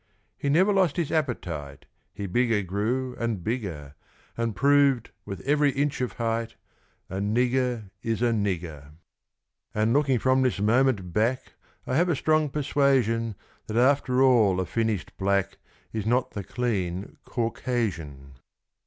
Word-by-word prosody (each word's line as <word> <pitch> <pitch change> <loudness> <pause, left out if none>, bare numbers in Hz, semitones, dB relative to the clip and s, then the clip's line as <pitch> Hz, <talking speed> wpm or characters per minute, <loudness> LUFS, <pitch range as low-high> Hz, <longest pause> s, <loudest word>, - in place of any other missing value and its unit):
He 140 - -2
never 185 +8 +4
lost 185 -6 +2
his 170 -4 -1
appetite 85 - -3 0.3
He 100 - -6
bigger 110 +1 +1
grew, 115 +7 -2
and 115 -6 -2
bigger; 90 - -4 0.4
And 115 -2 -2
proved, 140 -1 +3
with 100 -2 -6
every 145 +1 +3
inch 140 0 -1
of 125 - -2
height, 115 0 -2 0.5
A 95 - -5
nigger 120 +1 0
is 115 0 -1
a 120 - +3
nigger. 85 -9 -3 0.8
And, 110 +2 +2
looking 135 -2 +3
from 130 +2 +2
this 125 -6 +1
moment 105 -4 +2
back, 115 +4 0 0.3
I 130 - 0
have 175 +2 +3
a 170 - +2
strong 155 +1 +2
persuasion 130 -6 +1 0.3
That, 110 - -3
after 130 0 +3
all, 110 -8 +4
a 95 - 0
finished 110 -4 -2
black 100 0 0 0.3
Is 110 -1 -3
not 125 +2 +1
the 100 - -5
"clean" 100 -6 -3
Caucasian. 95 - -3
115 Hz, 140 wpm, -26 LUFS, 100-130 Hz, 0.8 s, never